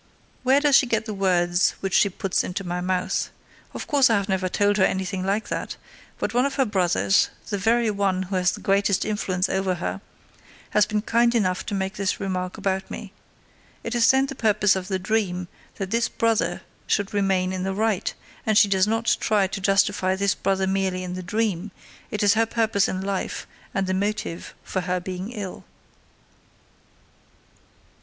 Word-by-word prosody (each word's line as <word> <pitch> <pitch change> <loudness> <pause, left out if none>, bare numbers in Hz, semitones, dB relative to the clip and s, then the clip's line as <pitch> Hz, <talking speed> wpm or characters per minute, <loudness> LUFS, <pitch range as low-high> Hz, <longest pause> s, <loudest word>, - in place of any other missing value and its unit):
Where 265 +2 +4
does 290 -1 +4
she 260 - +5
get 225 -1 0
the 215 - -4
words 180 -2 +2
which 195 -1 -3
she 200 - +5
puts 190 0 -1
into 185 +2 -4
my 180 0 -3
mouth? 180 0 -1 0.4
Of - - -6
course 275 -3 +4
I 225 - +4
have 200 -1 0
never 190 -2 0
told 205 +2 +2
her 190 - +4
anything 190 0 0
like 200 +3 -1
that, - - -3 0.4
but - - -2
one 250 +3 +3
of 275 - -5
her 270 - +2
brothers, 190 -2 +2 0.2
the 205 -3 -2
very 225 +2 +2
one 195 -2 0
who 190 +1 -4
has 180 -1 +2
the - - -8
greatest 200 0 +2
influence 190 -3 -1
over 190 -1 0
her, 95 - -4 0.7
has 210 -1 +4
been 210 -1 -1
kind 235 +1 +2
enough 185 -5 +1
to 205 - -2
make 190 +1 -3
this 200 -1 -1
remark 185 -2 -3
about 190 0 -2
me. 205 -2 -8 0.7
It 230 - -4
is 235 -1 +4
then 265 0 +4
the 275 - -5
purpose 210 -5 +3
of 185 -1 -4
the 190 -1 -1
dream 185 -2 -1 0.3
that 195 -1 -5
this 230 +1 +1
brother 230 -1 0 0.2
should 205 -1 0
remain 190 -2 +1
in 185 - -3
the 190 +1 -2
right; 215 -2 0 0.3
and 215 -1 +2
she 210 - +7
does 190 0 +2
not 225 +1 +1
try 210 -2 +2
to 195 +1 -4
justify 195 -1 +2
this 200 +1 +1
brother 195 -1 0
merely 190 -1 -1
in 180 0 -5
the 185 - -5
dream; 205 0 -1 0.4
it 210 - -2
is 205 0 +5
her 225 0 +2
purpose 220 -4 +1
in 185 - -3
life 195 -1 -3 0.3
and 195 - -1
the 185 - -1
motive 195 -3 -3
for 185 - -2
her 180 0 -1
being 185 +4 -5
ill. 205 -6 -6
195 Hz, 190 wpm, -24 LUFS, 185-215 Hz, 0.7 s, she